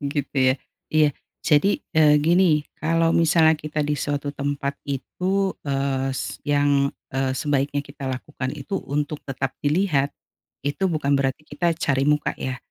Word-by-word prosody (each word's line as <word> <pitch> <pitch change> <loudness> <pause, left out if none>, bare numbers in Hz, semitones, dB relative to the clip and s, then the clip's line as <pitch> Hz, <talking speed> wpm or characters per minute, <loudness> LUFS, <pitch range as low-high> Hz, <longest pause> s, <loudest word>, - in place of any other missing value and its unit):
Gitu 145 0 -2 0.2
ya. - - -5 0.4
Iya 155 -1 +5 0.4
jadi, 150 +6 +4 0.2
eee, 150 -1 +6
gini. 165 -2 +4
Kalo 165 +1 +1
misalnya 160 -1 +5
kita 150 -1 -3
di 150 - 0
suatu 145 0 -2
tempat 140 0 -2
itu, 185 +8 -1
eee, 135 -1 -1
s 130 - -4
yang, 145 -1 +2 0.2
eee, 135 0 0
sebaiknya 145 0 0
kita 140 -1 -6
lakukan 130 0 -4
itu 150 +7 -4
untuk 145 +1 -3
tetap 135 -1 -2
dilihat, 145 -2 +2 0.6
itu 145 +7 -1
bukan 150 -4 0
berarti 140 +2 0
kita 175 +2 0
cari 140 -5 +1
muka 150 0 +1
ya, 130 -1 -3
145 Hz, 145 wpm, -23 LUFS, 140-155 Hz, 0.6 s, eee